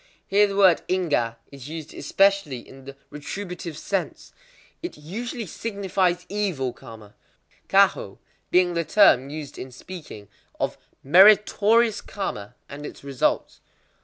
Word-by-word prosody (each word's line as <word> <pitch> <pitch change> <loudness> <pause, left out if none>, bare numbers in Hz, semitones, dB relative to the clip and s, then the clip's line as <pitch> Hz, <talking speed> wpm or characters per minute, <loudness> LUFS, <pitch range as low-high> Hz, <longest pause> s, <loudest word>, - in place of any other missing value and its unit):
Here 205 +1 +4
the 200 - -5
word 190 -4 +5
ingwa 150 -11 0 0.2
is 140 0 -10
used 160 -1 -8
especially 195 -11 +1
in 135 0 -14
the 140 0 -9 0.2
retributive 170 +2 -7
sense. 195 +2 -4 0.5
It 345 - -6
usually 225 - -6
signifies 190 -2 -2
evil 185 -12 -2
karma; 110 -5 -13 0.6
kwahō - - +3 0.3
being 180 -1 +3
the 170 0 0
term 140 -9 +4
used 150 -1 -8
in 130 - -8
speaking 130 - -10 0.3
of - - -1 0.3
meritorious 210 - +5
karma 110 - -6
and 145 +1 -9
its 150 - -9
results. 140 -2 -1
175 Hz, 125 wpm, -24 LUFS, 140-200 Hz, 0.6 s, word